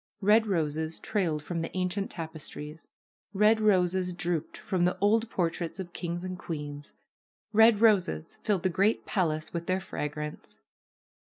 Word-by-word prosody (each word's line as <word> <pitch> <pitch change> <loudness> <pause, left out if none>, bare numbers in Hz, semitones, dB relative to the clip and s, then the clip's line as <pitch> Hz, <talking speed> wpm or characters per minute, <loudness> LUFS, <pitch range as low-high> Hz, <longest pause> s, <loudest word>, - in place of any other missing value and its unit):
Red 215 +3 +5
roses 160 -3 -1
trailed 175 -9 -1
from 165 +1 -3
the 165 - -3
ancient 185 +2 -1
tapestries; 160 -1 -7 0.5
red 215 +2 +4
roses 185 -3 +2
drooped 175 -3 -2
from 185 -2 -1
the 180 +1 +2
old 220 +3 +2
portraits 170 -1 -2
of 180 -2 -6
kings 175 0 -4
and 185 -1 -5
queens; 145 -3 -6 0.6
red 220 0 +6
roses 190 -7 +3
filled 200 -5 0
the 185 - +3
great 195 +5 +1
palace 160 -5 -1
with 170 0 -4
their 185 +1 +1
fragrance. 150 -3 -6
180 Hz, 145 wpm, -29 LUFS, 160-200 Hz, 0.6 s, red